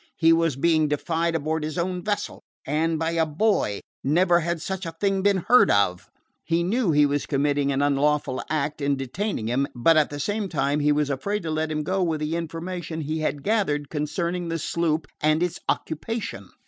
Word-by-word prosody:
He 165 Hz, 0 st, +5 dB
was 165 Hz, -4 st, +2 dB
being 155 Hz, +2 st, +2 dB
defied 165 Hz, +3 st, -1 dB
aboard 160 Hz, 0 st, -1 dB
his 155 Hz, +1 st, -4 dB
own 180 Hz, +1 st, -2 dB
vessel 205 Hz, -1 st, -3 dB, 0.2 s
and 160 Hz, +3 st, 0 dB
by 165 Hz, +1 st, -1 dB
a 165 Hz, -1 st, +2 dB
boy! 155 Hz, -, +1 dB, 0.2 s
Never 175 Hz, +5 st, +3 dB
had 170 Hz, 0 st, -2 dB
such 190 Hz, +2 st, -4 dB
a 165 Hz, -, -5 dB
thing 195 Hz, -1 st, +1 dB
been 195 Hz, -3 st, +2 dB
heard 250 Hz, -, +6 dB
of. 100 Hz, -3 st, +1 dB, 0.3 s
He 170 Hz, +1 st, +1 dB
knew 215 Hz, +3 st, +1 dB
he 150 Hz, -1 st, +5 dB
was 145 Hz, 0 st, -1 dB
committing 145 Hz, 0 st, +1 dB
an 140 Hz, +1 st, +1 dB
unlawful 145 Hz, -1 st, +1 dB
act 150 Hz, -1 st, -1 dB
in 140 Hz, 0 st, +1 dB
detaining 135 Hz, -, -3 dB
him, 130 Hz, +5 st, 0 dB
but 155 Hz, +7 st, +4 dB
at 150 Hz, -, +3 dB
the 145 Hz, -, -6 dB
same 205 Hz, +5 st, -2 dB
time 140 Hz, -2 st, 0 dB
he 150 Hz, 0 st, +3 dB
was 145 Hz, -1 st, +1 dB
afraid 200 Hz, +9 st, -2 dB
to 160 Hz, -, -3 dB
let 155 Hz, 0 st, -1 dB
him 155 Hz, 0 st, -1 dB
go 190 Hz, +5 st, -1 dB
with 165 Hz, -3 st, 0 dB
the 155 Hz, +2 st, -2 dB
information 165 Hz, 0 st, -4 dB
he 155 Hz, +2 st, -3 dB
had 145 Hz, -2 st, -2 dB
gathered 150 Hz, -9 st, 0 dB
concerning 170 Hz, +3 st, -2 dB
the 165 Hz, -, -1 dB
sloop 160 Hz, -1 st, -1 dB, 0.2 s
and 155 Hz, +2 st, +3 dB
its 180 Hz, -, -2 dB
occupation. 160 Hz, -, -3 dB
160 Hz, 200 wpm, -24 LUFS, 145-175 Hz, 0.3 s, heard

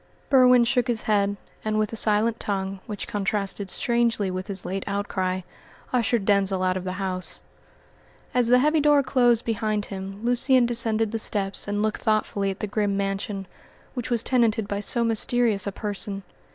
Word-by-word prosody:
Berwin 250 Hz, -2 st, +6 dB
shook 240 Hz, +2 st, +1 dB
his 235 Hz, -3 st, -1 dB
head, 205 Hz, -1 st, +1 dB, 0.3 s
and 215 Hz, 0 st, -1 dB
with 215 Hz, 0 st, -1 dB
a -, -, -2 dB
silent 220 Hz, +1 st, +3 dB
tongue, 195 Hz, -1 st, -2 dB
which 205 Hz, -1 st, -5 dB
contrasted 200 Hz, -1 st, -2 dB
strangely 235 Hz, -5 st, 0 dB
with 185 Hz, +2 st, -5 dB
his 195 Hz, -3 st, -5 dB
late 195 Hz, +1 st, -3 dB
outcry, 190 Hz, -2 st, -2 dB, 0.5 s
ushered 235 Hz, -3 st, +1 dB
Denzil 195 Hz, -2 st, +2 dB
out 185 Hz, 0 st, +1 dB
of 185 Hz, 0 st, -4 dB
the 185 Hz, -, -3 dB
house. 185 Hz, -1 st, -3 dB, 0.9 s
As 245 Hz, -2 st, +2 dB
the 250 Hz, +1 st, +6 dB
heavy 300 Hz, +5 st, +3 dB
door 295 Hz, -1 st, +4 dB
closed 245 Hz, -3 st, +2 dB
behind 215 Hz, -2 st, -1 dB
him 195 Hz, +3 st, -7 dB
Lucian 245 Hz, +1 st, +3 dB
descended 225 Hz, -2 st, +1 dB
the 225 Hz, -, -2 dB
steps 200 Hz, -2 st, 0 dB
and 205 Hz, +1 st, -1 dB
looked 215 Hz, 0 st, -2 dB
thoughtfully 210 Hz, -2 st, 0 dB
at 195 Hz, -, -6 dB
the -, -, -1 dB
grim 205 Hz, -1 st, -1 dB
mansion, 195 Hz, 0 st, -3 dB, 0.5 s
which 245 Hz, -2 st, -4 dB
was 235 Hz, -2 st, +1 dB
tenanted 230 Hz, -4 st, +1 dB
by 200 Hz, 0 st, -3 dB
so 220 Hz, +3 st, +1 dB
mysterious 225 Hz, -2 st, +1 dB
a -, -, -1 dB
person. 200 Hz, -1 st, -3 dB
210 Hz, 175 wpm, -24 LUFS, 195-235 Hz, 0.9 s, Berwin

